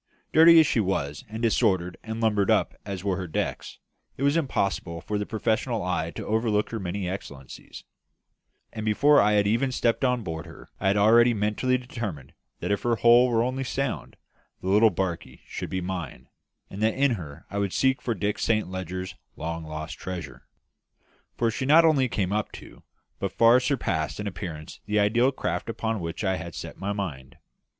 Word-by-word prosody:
Dirty 165 +1 +8
as 160 - +6
she 120 - +1
was, 75 -8 -1
and 110 +2 -6
disordered 95 -6 +2
and 110 0 -5
lumbered 105 -3 +1
up - - +2
as 95 -2 -5
were 95 -3 0
her 90 -2 -4
decks, 80 - -3 0.4
it 135 - -3
was 140 +2 +3
impossible 100 - -1
for 105 +4 -3
the 105 - -3
professional 110 0 -1
eye 90 -3 -1
to - - -6
overlook 110 -1 0
her 115 - -3
many 95 0 -3
excellencies; 75 -8 -8 0.9
and 110 - -5
before 140 +8 +4
I 105 - +3
had 105 -1 +3
even 115 +6 +1
stepped 120 0 0
on 125 -2 +1
board 80 -4 -5
her - - -14
I - - -1
had 100 +2 +3
already 115 +3 +5
mentally 105 +5 +1
determined 115 - -6 0.3
that - - -2
if 100 - 0
her 120 -1 +1
hull 120 +2 +6
were 115 -1 +2
only 130 +2 -2
sound, 135 -1 -3 0.4
the 95 - -4
little 105 +3 +6
barkie 90 -2 -4
should - - -6
be 95 - -2
mine, 90 -8 -6 0.4
and 100 - -8
that 110 0 +2
in 140 0 +3
her 80 -10 -6
I 100 - -2
would 100 -2 -1
seek 130 +5 +1
for 115 - -2
Dick 105 -1 -2
Saint 110 -4 0
Leger's 95 0 -5 0.2
long 85 +1 -4
lost 80 0 -6
treasure. 75 -8 -7 0.9
For 115 -1 +1
she 130 +4 -3
not 165 +3 +7
only 140 -6 +3
came 100 -4 -1
up 105 0 -1
to - - -12 0.4
but - - -3
far 115 +2 +6
surpassed 95 - -1
in 105 - -4
appearance 85 -5 -6
the 105 - 0
ideal 115 +6 +3
craft 90 -7 -3
upon 110 -1 -2
which 85 +3 -5
I 95 -2 +1
had 85 0 -7
set - - -8
my 100 +1 -2
mind. 80 -11 -5
105 Hz, 190 wpm, -26 LUFS, 90-120 Hz, 0.9 s, Dirty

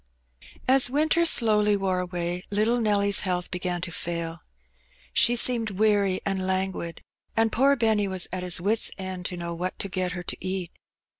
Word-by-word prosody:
» - - -21
As 265 -2 +4
winter 310 +5 +2
slowly 210 -6 +4
wore 190 -2 -1
away, 175 -1 -3
little 215 +4 +1
Nelly^s 200 -2 +2
health 180 -2 -3
began 180 -1 -2
to 175 - -4
fail. 170 0 -4 0.7
She 240 +1 +4
seemed 235 -2 +3
weary 200 -2 +1
and 190 -1 -1
languid, 185 -3 -2 0.3
and 225 0 +2
poor 275 +3 +3
Benny 220 -4 +1
was 190 -2 +1
at 185 - -3
his 180 -1 +2
wits^ 210 +5 +1
end 185 -2 -5
to 180 - -6
know 170 0 -5
what 180 +2 -4
to - - -2
get 185 -1 -2
her 175 -1 -6
to - - -4
eat. 185 -2 -3
190 Hz, 175 wpm, -25 LUFS, 180-220 Hz, 0.7 s, As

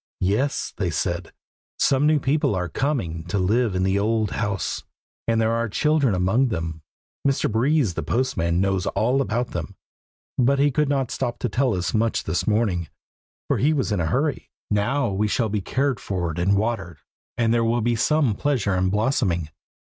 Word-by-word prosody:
"Yes," 105 +10 0
they 95 -3 0
said, 85 +2 -2 0.5
"some 140 +2 +3
new 155 -1 +4
people 135 -5 +1
are 90 -1 -1
coming 85 - -2
to 90 +3 -2
live 105 +3 +1
in 90 - +1
the 95 +1 +2
old 110 0 +1
house, 105 -4 -2 0.4
and 115 -1 +2
there 110 0 +2
are 115 0 0
children 145 -1 +2
among 95 +9 +2
them. 80 -6 -4 0.5
Mr. 135 -4 +1
Breeze, 125 - +2
the - - -3
postman, 90 -10 0
knows 95 -1 0
all 125 +5 +1
about 120 -1 -1
them, - - -5 0.6
but 135 +3 +4
he 145 +1 +3
could 150 +2 +1
not 135 -3 0
stop 120 -1 -2
to 125 - -2
tell 125 0 +1
us 90 0 -2
much 115 +1 +1
this 80 +2 -2
morning, 105 -7 +1 0.6
for - - +1
he 150 +4 +3
was 135 -7 -1
in 100 - 0
a 85 - 0
hurry. 140 - -1 0.2
Now 110 +6 +1
we 100 +2 0
shall 110 +1 0
be 105 0 -1
cared 130 +4 0
for, 90 -4 -2
and 95 +4 +2
watered, 100 -7 -2 0.4
and 115 -1 +2
there 115 -1 +2
will 115 +1 +1
be 120 +1 +1
some 145 0 +2
pleasure 110 -4 0
in 95 0 +1
blossoming. 105 - 0
110 Hz, 185 wpm, -23 LUFS, 95-130 Hz, 0.6 s, new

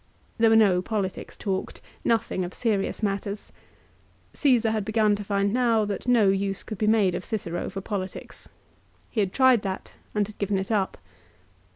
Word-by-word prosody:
There 225 0 +5
were 225 - +5
no 200 -5 +5
politics 195 -1 -3
talked, 190 -2 -3 0.2
nothing 225 -5 +1
of 175 +1 -6
serious 215 -2 -1
matters. 200 0 -3 0.8
Caesar 245 -6 +3
had 215 -2 -1
begun 215 0 +2
to 205 - -5
find 200 0 0
now 235 -3 +3
that 205 +3 -4
no 230 -5 +5
use 195 0 -1
could 215 - -7
be 215 - +1
made 210 -4 +4
of 180 - -3
Cicero 175 -6 -3
for 195 - -6
politics. 195 -2 -6 0.6
He 225 - -2
had 195 -3 +1
tried 260 -2 +5
that 195 -2 -5 0.2
and 210 -1 +2
had 210 +1 -13
given 200 -1 0
it 190 +3 -3
up. 200 -3 0
205 Hz, 175 wpm, -26 LUFS, 195-220 Hz, 0.8 s, There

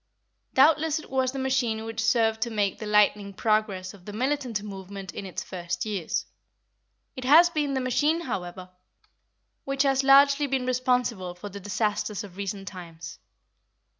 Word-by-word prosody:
Doubtless 305 +3 +4
it 310 - -9
was 260 -1 +1
the 275 - -7
machine 250 -4 0
which 225 0 -3
served 225 -1 +2
to 235 - 0
make 205 -3 -1
the 215 - -5
lightning 210 -1 +3
progress 210 -4 0
of 195 -3 -16
the 205 - -7
militant 250 -2 -1
movement 195 -2 -8
in 195 - -6
its 185 - -5
first 175 0 -4
years; 200 -6 -2 0.9
it 255 - -6
has 325 +7 +7
been 295 -4 -1
the 265 - 0
machine, 295 +6 +1
however, 185 - -5 0.9
which 275 0 0
has 270 -1 +2
largely 280 +1 +6
been 265 -2 -1
responsible 250 -7 0
for 205 +3 -8
the 200 +1 -8
disasters 210 +1 -2
of 195 -3 -11
recent 195 0 -5
times. 170 -3 -9
220 Hz, 160 wpm, -26 LUFS, 195-265 Hz, 0.9 s, has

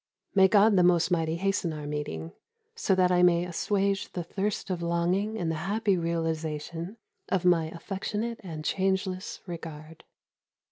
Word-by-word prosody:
May 190 -1 +6
God 205 +1 +5
the - - +6
Most 175 0 +4
Mighty 165 -2 +1
hasten 190 -1 0
our 150 -1 -6
meeting, 145 - -4 0.4
so 190 - +1
that 180 -1 +3
I 180 0 +4
may 175 -1 +4
assuage 195 +2 0
the 175 - -3
thirst 200 +3 -2
of 175 -2 -2
longing 175 +6 0
in 170 -6 -1
the - - 0 0.2
happy 210 -1 +2
realisation 165 +2 -3 0.3
of 185 -2 0
my 170 -3 +4
affectionate 205 +7 -4
and 155 -4 -7
changeless 190 0 -1
regard. 160 -3 -8
180 Hz, 150 wpm, -28 LUFS, 165-195 Hz, 0.4 s, May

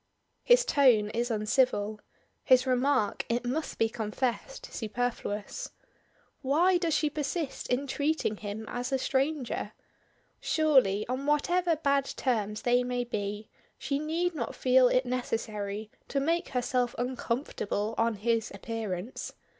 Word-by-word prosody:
His - - +5
tone 240 - +4
is 235 +2 -1
uncivil; 215 -1 +1 0.4
his 255 -1 +5
remark, 255 -4 +1
it 240 +1 0
must 295 +6 -2
be 225 - +3
confessed, 230 +3 -3
superfluous. 220 -2 -3 0.7
Why 345 +7 +3
does 335 -3 +1
she 305 - +2
persist 295 +1 -3
in 250 +3 0
treating 285 -5 0
him 210 +1 -6
as 245 +2 -4
a 265 - +2
stranger? 270 0 -1 0.7
Surely, 260 -11 +3
on 260 +3 -3
whatever 340 +4 +2
bad 280 -3 +1
terms 215 -4 -1
they 245 -1 +3
may 245 0 -1
be, 210 -2 -4 0.3
she 280 0 -2
need 335 +4 -1
not 310 - -4
feel 255 0 +5
it 255 +1 +2
necessary 215 -4 -3 0.2
to 280 - 0
make 335 +5 0
herself 250 -1 0
uncomfortable 235 -4 -2
on 230 0 +2
his 225 +2 0
appearance. 215 0 -5
250 Hz, 130 wpm, -29 LUFS, 220-280 Hz, 0.7 s, His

